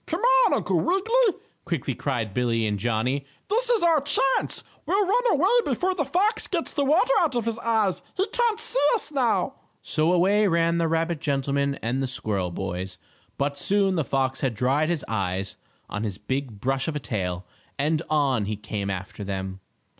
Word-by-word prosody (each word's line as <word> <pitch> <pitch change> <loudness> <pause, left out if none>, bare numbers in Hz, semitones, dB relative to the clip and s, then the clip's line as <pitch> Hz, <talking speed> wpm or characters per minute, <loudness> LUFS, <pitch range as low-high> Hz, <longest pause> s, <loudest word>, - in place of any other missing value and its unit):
"Come 335 +4 -2 0.3
on, - - +2
Uncle - - 0
Wiggily!" 440 +4 +2 0.2
quickly 160 -6 -2
cried 115 -6 -3
Billie 115 -1 0
and 105 -1 -1
Johnnie. 120 +5 0 0.3
"This 480 +3 +2
is 465 -6 +3
our 330 -4 +4
chance. 270 -1 +2 0.2
We'll 405 +1 +2
run 475 +6 +2
away - - +3
before 375 -2 0
the 315 -6 -1
fox 400 - +1
gets 340 -3 -1
the 285 - 0
water 320 - +3
out 310 -7 +1
of 235 -2 0
his 230 0 -2
eyes. 220 -5 +1 0.2
He 380 - +2
can't 470 -1 +1
see - - +3 0.2
us 410 - 0
now." 255 -6 +1 0.3
So 155 +2 +1
away 195 +4 +3
ran 170 -1 +2
the 165 - +1
rabbit 165 0 -1
gentleman 140 -2 0
and 120 +4 -1
the 135 - -1
squirrel 105 -7 -2
boys, 90 0 -5 0.4
but 140 0 -1
soon 200 -1 +2
the 165 -4 0
fox 130 -1 -1
had 130 -5 -1
dried 135 +7 +1
his 170 -5 -2
eyes 95 -3 -2 0.3
on 105 - -4
his 100 -5 -3
big 130 -1 -4
brush 135 +3 -1
of 160 - -2
a - - -1
tail, 90 -7 -3 0.3
and 155 +2 +1
on 140 -8 +1
he 105 +1 -2
came 105 -1 -4
after 95 +2 -5
them. 95 -1 -4
145 Hz, 185 wpm, -25 LUFS, -, 0.4 s, our